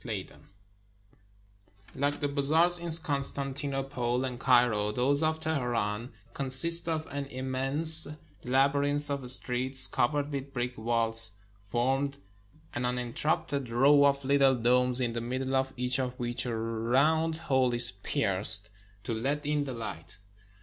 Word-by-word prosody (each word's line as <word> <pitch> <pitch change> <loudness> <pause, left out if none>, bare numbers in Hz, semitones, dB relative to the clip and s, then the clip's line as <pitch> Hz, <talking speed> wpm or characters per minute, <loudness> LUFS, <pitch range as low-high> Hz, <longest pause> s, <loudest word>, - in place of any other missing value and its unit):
\DEN - - -8 1.5
Like 145 +2 -3
the 145 - 0
bazaars 155 +5 +1
in 170 0 -6
Constantinople 140 -4 -1
and 125 -2 -6
Cairo, 120 -5 +2
those 135 +6 +1
of 160 0 -1
Teheran 120 -7 -3 0.2
consist 140 +6 +2
of 160 -1 -3
an 140 0 -5
immense 135 +5 +4 0.4
labyrinth 140 +3 0
of 135 -3 -4
streets 130 +1 +3
cov 120 - -1
ered 145 0 -3
with 140 -1 -6
brick 125 -1 -3
vaults, 115 -1 +2 0.3
forming 130 +7 -2 0.6
an 120 - -4
uninterrupted 125 +2 -3
row 140 +5 +4
of 140 -1 0
little 135 -1 +3
domes, 125 +1 +2
in 120 -2 -2
the 115 - -4
middle 130 +3 -4
of 135 0 -1
each 125 +1 +2
of 125 -1 -4
which 120 +1 -2
a 115 -2 -3
round 130 +9 0
hole 130 -6 0
is 120 0 +3
pierced 100 +2 +3 0.3
to 115 - -4
let 140 +6 -3
in 145 -1 -1
the 130 - -6
light. 105 -9 -8
130 Hz, 135 wpm, -28 LUFS, 120-145 Hz, 1.5 s, immense